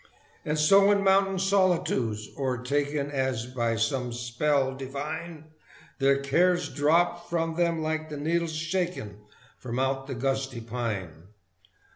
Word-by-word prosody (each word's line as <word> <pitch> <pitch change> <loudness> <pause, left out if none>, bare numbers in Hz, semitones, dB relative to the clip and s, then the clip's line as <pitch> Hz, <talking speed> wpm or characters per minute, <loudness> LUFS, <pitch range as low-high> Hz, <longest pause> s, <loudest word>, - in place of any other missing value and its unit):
And 150 0 -1
so 195 +6 +6
in 200 -1 +3
mountain 195 0 +3
solitudes 180 - +1
o'ertaken 140 +2 -1
As 130 -4 -1
by 120 -2 -1
some 120 +3 -1
spell 130 +3 0
divine 155 +4 -6 0.5
Their 135 0 +4
cares 175 +6 +2
dropped 170 +4 +1
from 165 -1 0
them 170 -1 0
like 155 0 -2
the 150 - -6
needles 165 +2 -1
shaken 165 - -3 0.4
From 120 -1 -5
out 135 +1 -1
the 135 - -4
gusty 135 0 -2
pine. 105 -8 -5
145 Hz, 125 wpm, -27 LUFS, 125-170 Hz, 0.5 s, so